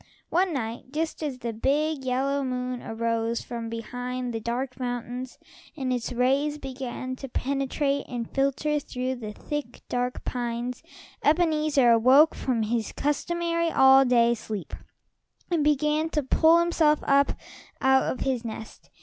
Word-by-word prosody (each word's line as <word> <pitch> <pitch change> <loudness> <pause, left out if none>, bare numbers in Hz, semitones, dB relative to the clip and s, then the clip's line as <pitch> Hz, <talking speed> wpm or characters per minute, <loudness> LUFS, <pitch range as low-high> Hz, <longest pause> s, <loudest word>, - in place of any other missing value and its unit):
One 365 +2 +2
night, 235 -5 -4
just 320 +2 -2
as 290 -4 -3
the 235 -2 -4
big, 285 +5 0
yellow 270 +2 0
moon 250 -1 -3
arose 230 0 -1
from 230 -1 -5
behind 245 +2 -4
the 225 - -2
dark 250 +3 -3
mountains, 245 +1 -4 0.4
and 260 -3 -1
its 245 0 -3
rays 270 +5 +1
began 255 -2 -5
to 270 - -7
penetrate 275 +2 -1
and 240 -3 -4
filter 275 +2 0
through 255 -2 -4
the 215 -3 -6
thick 290 +3 -6
dark 250 0 -2
pines, 240 0 -3 0.4
Ebenezer 305 -5 +3
awoke 260 +7 +6
from 240 -4 -1
his 225 0 -1
customary, 335 +3 0
all 265 -2 +7
day 235 -2 +4
sleep 215 -3 -6 0.8
and 330 -4 +2
began 300 +2 +2
to 300 -2 -1
pull 320 +5 +5
himself 335 -3 +3
up 280 0 +3 0.5
out 265 0 +4
of 255 - -6
his 255 -3 -1
nest. 225 -1 -8
260 Hz, 140 wpm, -26 LUFS, 240-295 Hz, 0.8 s, all